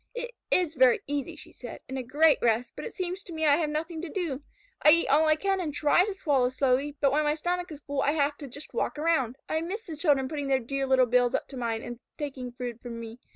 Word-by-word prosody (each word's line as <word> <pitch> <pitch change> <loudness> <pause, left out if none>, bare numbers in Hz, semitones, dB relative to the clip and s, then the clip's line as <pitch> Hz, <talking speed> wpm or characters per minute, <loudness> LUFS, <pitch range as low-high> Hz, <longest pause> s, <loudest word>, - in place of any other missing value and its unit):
"It 485 0 -4 0.2
is 350 -4 +2
very 255 -4 +4
easy," 290 +3 -3
she - - -12
said, 245 - -9
"and 265 - -6
a 265 - -2
great 290 +4 +3
rest, 235 +1 +1
but - - -6
it - - -7
seems 365 0 -3
to 360 - -9
me 315 0 -1
I 290 -1 +5
have 320 -3 0
nothing 315 +2 -3
to 350 - -6
do. 320 -8 -3 0.4
I - - +7
eat 335 +2 +5
all 305 +3 +4
I 310 - +5
can 390 +3 0
and 315 -4 -2
try 300 +5 +3
to 410 -2 -4
swallow 280 -9 +2
slowly, 270 +2 0
but 275 -2 +3
when 300 +2 +2
my 295 0 +1
stomach 355 +2 -2
is 300 -1 -9
full 285 -1 -2
I 285 - +2
have 290 -1 +1
to 285 - -8
just 285 +4 -10
walk 470 - -1
around. 295 -6 +1
I 315 - -1
miss 395 +7 -5
the 325 - -6
children 290 -4 +2
putting 290 -1 -4
their 270 -1 +3
dear 270 +2 -3
little 260 -1 +5
bills 245 +1 +2
up - - -2
to 275 - -9
mine 230 -2 -2
and 240 -1 -7 0.2
taking 265 -4 -5
food 245 -1 -6
from 235 -2 -7
me. 230 +1 -8
290 Hz, 265 wpm, -28 LUFS, 255-320 Hz, 0.4 s, I